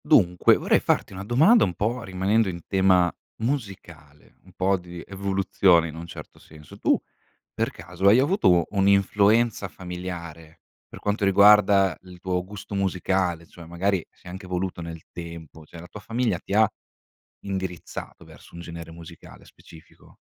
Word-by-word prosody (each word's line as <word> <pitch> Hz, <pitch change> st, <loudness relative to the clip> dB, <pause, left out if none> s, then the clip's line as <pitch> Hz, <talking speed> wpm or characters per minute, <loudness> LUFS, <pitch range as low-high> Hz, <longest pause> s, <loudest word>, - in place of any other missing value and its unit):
Dunque, 90 Hz, 0 st, +4 dB
vorrei -, -, +2 dB
farti -, -, -1 dB
una 95 Hz, +1 st, -7 dB
domanda 155 Hz, -, +5 dB
un 90 Hz, -, -1 dB
po' 115 Hz, +7 st, -2 dB
rimanendo 95 Hz, +2 st, 0 dB
in 85 Hz, -1 st, -6 dB
tema 95 Hz, -2 st, +3 dB, 0.3 s
musicale, 100 Hz, -, -6 dB
un 95 Hz, -, -17 dB
po' 95 Hz, +2 st, +1 dB
di 90 Hz, -1 st, -10 dB
evoluzione 95 Hz, -3 st, +2 dB
in 80 Hz, -, -10 dB
un 85 Hz, +1 st, -8 dB
certo -, -, -11 dB
senso. 75 Hz, -2 st, -15 dB
Tu, -, -, +2 dB, 0.5 s
per -, -, -1 dB
caso, 90 Hz, +2 st, -3 dB
hai 105 Hz, +4 st, +7 dB
avuto 130 Hz, -, +3 dB
un'influenza 100 Hz, +2 st, +2 dB
familiare, 85 Hz, -3 st, -8 dB, 0.3 s
per -, -, -12 dB
quanto 105 Hz, +1 st, -2 dB
riguarda 100 Hz, -1 st, +5 dB
il 90 Hz, -1 st, -14 dB
tuo 90 Hz, 0 st, -2 dB
gusto 100 Hz, +2 st, -10 dB
musicale, 95 Hz, -3 st, -1 dB
cioè 85 Hz, 0 st, -14 dB
magari 90 Hz, +1 st, -1 dB
si -, -, -30 dB
è -, -, -9 dB
anche 95 Hz, +2 st, -9 dB
evoluto 90 Hz, -1 st, -3 dB
nel 85 Hz, -1 st, -8 dB
tempo, 85 Hz, -2 st, -10 dB
cioè 85 Hz, -, -12 dB
la 85 Hz, -, -11 dB
tua 105 Hz, -, -10 dB
famiglia 115 Hz, +3 st, -1 dB
ti -, -, -7 dB
ha 110 Hz, +1 st, +5 dB, 0.7 s
indirizzato 95 Hz, -3 st, -6 dB
verso -, -, -16 dB
un 85 Hz, -, -8 dB
genere 85 Hz, -1 st, -9 dB
musicale 85 Hz, 0 st, -13 dB
specifico? 80 Hz, -1 st, -18 dB
95 Hz, 155 wpm, -24 LUFS, 85-100 Hz, 0.7 s, hai